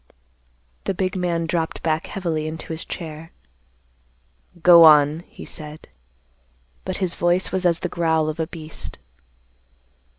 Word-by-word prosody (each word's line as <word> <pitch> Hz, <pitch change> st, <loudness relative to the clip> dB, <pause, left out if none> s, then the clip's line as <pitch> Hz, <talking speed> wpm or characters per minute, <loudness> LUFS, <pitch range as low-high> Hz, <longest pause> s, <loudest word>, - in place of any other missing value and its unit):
The 195 Hz, -, -1 dB
big 185 Hz, +1 st, -1 dB
man 170 Hz, -2 st, -1 dB
dropped 165 Hz, 0 st, -2 dB
back 160 Hz, -1 st, 0 dB
heavily 165 Hz, -5 st, -3 dB
into 160 Hz, +1 st, -6 dB
his 160 Hz, +3 st, -4 dB
chair. 160 Hz, -1 st, -7 dB, 1.3 s
"Go 170 Hz, -1 st, +9 dB
on," 150 Hz, -1 st, +6 dB
he -, -, -11 dB
said. 155 Hz, 0 st, -9 dB, 1.0 s
But 185 Hz, -1 st, -2 dB
his 185 Hz, -3 st, -1 dB
voice 175 Hz, +2 st, +1 dB
was 185 Hz, -1 st, +1 dB
as 170 Hz, -1 st, +2 dB
the -, -, -1 dB
growl 160 Hz, -3 st, +1 dB
of 155 Hz, +1 st, -4 dB
a 160 Hz, -, -1 dB
beast. 160 Hz, -2 st, -7 dB
165 Hz, 135 wpm, -22 LUFS, 155-175 Hz, 1.3 s, Go